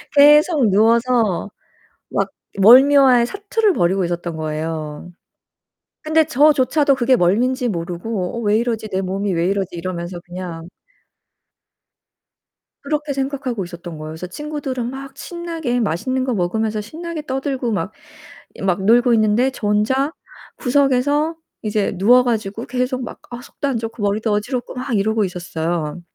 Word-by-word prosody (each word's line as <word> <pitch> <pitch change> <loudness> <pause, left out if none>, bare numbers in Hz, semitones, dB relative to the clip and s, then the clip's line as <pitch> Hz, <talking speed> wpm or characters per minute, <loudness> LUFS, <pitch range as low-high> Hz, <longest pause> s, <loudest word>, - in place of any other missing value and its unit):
계속 295 - +6
누워서 225 -1 +2 0.6
막 - - -1 0.3
멀미와의 255 +3 +7
사투를 410 - 0
벌이고 185 - +1
있었던 175 -1 -4
거예요. 155 +1 -4 0.9
근데 315 +1 +3
저조차도 290 -1 +3
그게 255 0 +3
멀미인지 245 +7 +1
모르고 180 +2 -3
'어 - - -3
왜 210 -2 +2
이러지? 225 -2 -2
내 190 -1 -1
몸이 195 +1 -2
왜 170 +1 0
이러지?' 195 -2 -2
이러면서 175 0 -5
그냥 175 -2 -7 2.1
그렇게 295 0 -2
생각하고 265 -5 -3
있었던 175 -1 -9
거예요. 155 0 -7
그래서 160 +3 -7
친구들은 270 +1 -4
막 270 +1 -8
신나게 330 -8 -3
맛있는 245 +6 -1
거 255 -1 -1
먹으면서 215 +3 -1
신나게 325 +8 -6
떠들고 265 -2 -2
막 190 -2 -2 0.6
이 - - -11
막 190 0 0
놀고 240 +3 +5
있는데 220 +4 +3
저 230 -5 -4
혼자 260 +8 +1 0.5
구석에서 285 +4 +1 0.3
이제 210 -1 0
누워 245 +7 +5
가지고 225 -2 -2
계속 255 +1 -2
막 - - -8
아 240 0 -7
속도 280 - -5
안 260 - -1
좋고 225 -1 -5
머리도 210 +2 0
어지럽고 240 +5 -2
막 255 0 -4
이러고 215 +2 +1
있었어요. 175 -2 -3
230 Hz, 320 characters per minute, -20 LUFS, 185-265 Hz, 2.1 s, 멀미와의